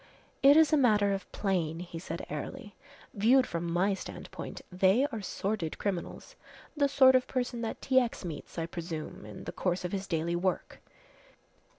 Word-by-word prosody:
"It 280 +2 +7
is 320 0 +5
a - - +6
matter 210 -6 +4
of 195 - -5
plane," 175 -6 -1
he 170 -2 -7
said 165 -1 -6
airily. 150 +7 -6 0.4
"Viewed 245 +6 +4
from 170 -3 -3
my 185 +4 +2
standpoint, 195 - -7
they 190 +8 +4
are 225 - -4
sordid 195 -3 -3
criminals 190 -4 -4 0.4
the 285 -2 +3
sort 265 -2 +6
of 255 -1 +3
person 245 -2 -2
that 225 - -4
T. 260 -1 +5
X. 235 -6 -3
meets, 160 -1 -7
I 165 - -1
presume, 165 - -6
in 105 - -9
the - - -5
course 180 -1 -1
of 180 - -3
his 195 -1 -3
daily 170 +1 -1
work. 185 +2 -2
195 Hz, 175 wpm, -30 LUFS, 170-245 Hz, 0.4 s, It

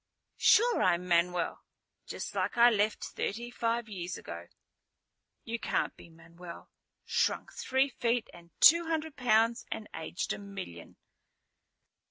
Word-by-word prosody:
"Sure, 475 +2 +5
I'm 180 0 +2
Manuel. 175 0 +1 0.5
Just - - -6
like - - -2
I 240 +1 +7
left, 210 0 0
thirty 235 +4 -4
five 235 -1 -1
years 185 -4 -5
ago." 85 +1 -8 1.0
"You 230 +1 -4
can't - - -1
be - - -15
Manuel, 170 +1 -12 0.3
shrunk - - 0
three 265 +1 +1
feet 240 -2 -1
and 170 0 -15
two 335 +2 +7
hundred 320 -2 -2
pounds 230 -1 +2
and 215 - -5
aged 160 +3 -3
a - - -7
million." 195 - -9
215 Hz, 130 wpm, -30 LUFS, 175-240 Hz, 1.0 s, I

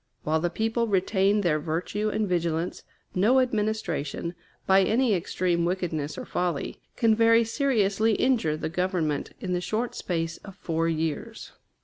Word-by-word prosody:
While 155 +1 +1
the 175 +2 0
people 225 +5 0
retain 195 +1 +2
their 160 -5 +1
virtue 175 +7 -2
and 215 0 -1
vigilance, 170 -1 -1 0.3
no 220 +8 +4
administration, 210 - -1 0.3
by 190 0 +5
any 230 +3 +2
extreme 175 -1 0
wickedness 170 -4 -2
or - - -5
folly, 175 -5 -2
can 225 -2 +3
very 230 +1 +5
seriously 225 -4 +1
injure 215 -11 +1
the - - -3
Government 175 -3 -1
in 185 -6 -3
the 180 - 0
short 225 +6 -2
space 165 -2 -3
of 195 -2 -12
four 165 -3 -1
years. 160 -2 -3
185 Hz, 145 wpm, -26 LUFS, 165-220 Hz, 0.3 s, by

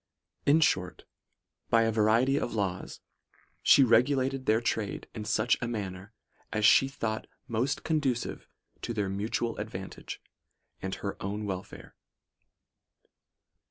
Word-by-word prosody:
In 150 +3 +6
short, 90 - +1 0.7
by 115 0 +5
a 115 - +2
variety 115 +5 +3
of 120 - -2
laws, 95 -3 -3 0.6
she 140 - +7
regulated 130 +2 +2
their 110 +1 +4
trade 110 -4 -2
in 105 -2 -6
such 110 +3 +2
a 120 - -1
manner 100 -3 -5 0.4
as 110 -1 +1
she 135 +6 +7
thought 115 -5 -3 0.2
most 125 +4 -1
conducive 140 -7 -1 0.3
to 120 - -4
their 100 -3 0
mu 100 +2 -2
tual 115 -1 -2
advantage 100 -3 -6 0.6
and 95 0 -3
her 100 - -5
own 105 +2 -3
welfare. 95 -1 -6
110 Hz, 125 wpm, -29 LUFS, 100-125 Hz, 0.7 s, she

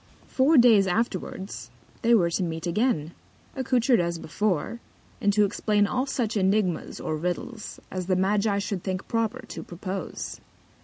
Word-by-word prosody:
Four 280 +4 +3
Days 225 -6 +6
afterwards, 195 -1 -2 0.3
they 235 0 +5
were 170 -6 +3
to 180 - 0
meet 165 -2 -3
again, 170 - 0 0.4
accoutred 255 -2 +2
as 170 -1 0
before, 190 +6 -1 0.4
and 205 -2 +3
to 210 0 +4
explain 205 +1 +1
all 255 +6 -1
such 235 -5 -1
Ænigmas, 195 -2 0
or 155 - -2
Riddles, 180 +7 -4
as 185 -1 -4
the 185 - +2
Magi 200 +2 +2
should 200 -2 -3
think 185 -1 -3
proper 230 -2 -1
to - - -7
propose. 185 +2 -6
200 Hz, 150 wpm, -26 LUFS, 180-230 Hz, 0.4 s, Days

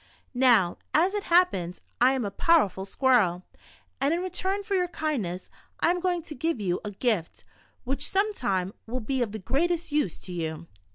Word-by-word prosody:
Now, 240 -9 +4 0.2
as 355 +6 +4
it 415 -1 -2
happens, 265 - +2 0.2
I 255 +2 +6
am 260 -4 -1
a 200 - -3
powerful 200 - +2
squirrel, 200 -7 +2 0.6
and 285 +4 +2
in 345 - -2
re 370 - -4
turn 385 +3 -1
for 400 - -4
your 365 -2 +2
kindness, 250 - -3 0.3
I 335 - +3
am 360 - -1
going 355 -2 0
to 310 - -8
give 320 0 -1
you 180 -3 -1
a 210 - -4
gift, 205 -4 -2 0.4
which 270 +2 -1
some 410 +2 +1
time 190 - -1
will 250 +3 -3
be 255 +3 -2
of 230 -4 -1
the 220 - -5
greatest 335 - -1
use 290 - 0
to 185 - -10
you. 160 -1 -4
260 Hz, 190 wpm, -27 LUFS, -, 0.6 s, I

